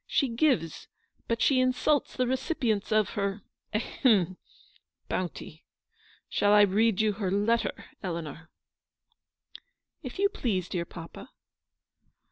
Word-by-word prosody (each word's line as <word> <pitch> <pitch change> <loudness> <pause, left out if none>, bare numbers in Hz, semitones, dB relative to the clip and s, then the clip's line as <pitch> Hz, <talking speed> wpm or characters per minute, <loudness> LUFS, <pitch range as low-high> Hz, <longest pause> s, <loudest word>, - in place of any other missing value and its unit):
She 275 - +1
gives, 230 - 0 0.4
but 230 -1 0
she 270 -2 +4
insults 255 +3 +1
the 255 - +1
recipients 250 - -1
of 215 -2 +3
her 200 0 -2
— - - -54
ahem 210 - +2 0.4
— - - -37
bounty. 175 -3 -4 0.6
Shall 205 0 +2
I 210 - +7
read 205 +1 +3
you 215 -1 +2
her 195 -2 -2
letter, 210 +4 0 0.2
Eleanor 165 -3 -5 0.6
?" - - -49
" - - -47 0.3
If 255 -6 -7
you 400 +1 +4
please, 200 - -2
dear 175 -2 -2
papa." 165 -1 -10
215 Hz, 130 wpm, -28 LUFS, 185-250 Hz, 0.6 s, I